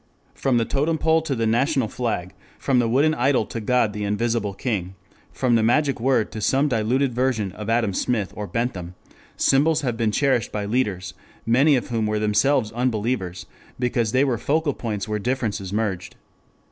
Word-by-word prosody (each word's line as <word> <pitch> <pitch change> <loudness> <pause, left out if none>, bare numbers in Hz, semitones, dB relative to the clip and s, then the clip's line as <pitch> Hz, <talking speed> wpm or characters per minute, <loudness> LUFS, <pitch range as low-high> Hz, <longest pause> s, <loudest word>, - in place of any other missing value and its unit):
From 130 -3 0
the 115 - +2
totem 150 +6 0
pole 160 +1 +2
to 155 -4 -2
the 115 -1 -1
national 130 +3 +1
flag, 105 -7 -3 0.2
from 130 -2 +1
the 115 -2 +1
wooden 145 +6 +3
idol 125 -3 +2
to 115 - -6
God 115 -1 +1
the 105 0 -4
Invisible 105 0 -1
King, 95 -6 -3 0.4
from 125 -2 0
the 115 - +4
magic 135 +4 +2
word 125 -2 +1
to 110 - -6
some 135 +6 +2
diluted 125 +2 +1
version 120 -5 0
of 105 +3 -7
Adam 115 -3 +1
Smith 105 0 -1
or 105 -1 -5
Bentham, 90 -4 -3 0.4
symbols 155 +3 +3
have 120 -5 -2
been 115 -2 +1
cherished 130 -2 +1
by 105 -1 -3
leaders, 100 -5 -1 0.3
many 135 +6 +4
of 125 - -2
whom 115 -3 0
were 105 0 0
themselves 110 +3 +2
unbelievers, 110 -6 -2 0.3
because 120 -3 0
they 130 +2 +3
were 125 -5 0
focal 150 +2 0
points 105 -5 -4
where 105 0 -2
differences 110 -5 -2
merged. 100 -4 -2
115 Hz, 180 wpm, -23 LUFS, 105-130 Hz, 0.4 s, the